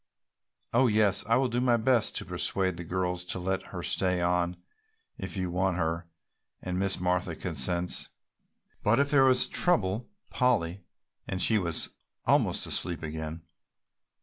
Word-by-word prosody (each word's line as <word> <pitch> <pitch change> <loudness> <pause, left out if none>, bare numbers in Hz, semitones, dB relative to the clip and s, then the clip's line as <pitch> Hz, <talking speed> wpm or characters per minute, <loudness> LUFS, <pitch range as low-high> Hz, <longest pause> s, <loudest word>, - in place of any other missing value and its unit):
"Oh 125 +2 +4
yes, 105 -3 +3
I 115 - +4
will 130 0 +2
do 120 +1 -1
my 120 -2 +3
best 115 0 +2
to - - -3
persuade 95 -2 0
the 85 - -7
girls 90 +1 -2
to 90 - -2
let 95 +1 -2
her - - -7
stay 90 -1 +1
on 90 0 0 0.6
if - - -5
you 90 -2 -2
want 90 0 0
her 85 0 -2 0.5
and 90 0 -3
Miss 95 0 +1
Martha 90 -1 0
consents. 85 +2 0 0.7
But 105 +3 +3
if 140 0 +2
there 135 -2 +6
is 130 0 +4
trouble, 110 - +1 0.2
Polly 100 -8 +1 0.2
" - - -47
and 95 - -3
she 110 +3 +3
was 85 -4 0 0.4
almost - - +2
asleep 85 -2 -1
again. 80 +1 -5
95 Hz, 155 wpm, -28 LUFS, 85-110 Hz, 0.7 s, there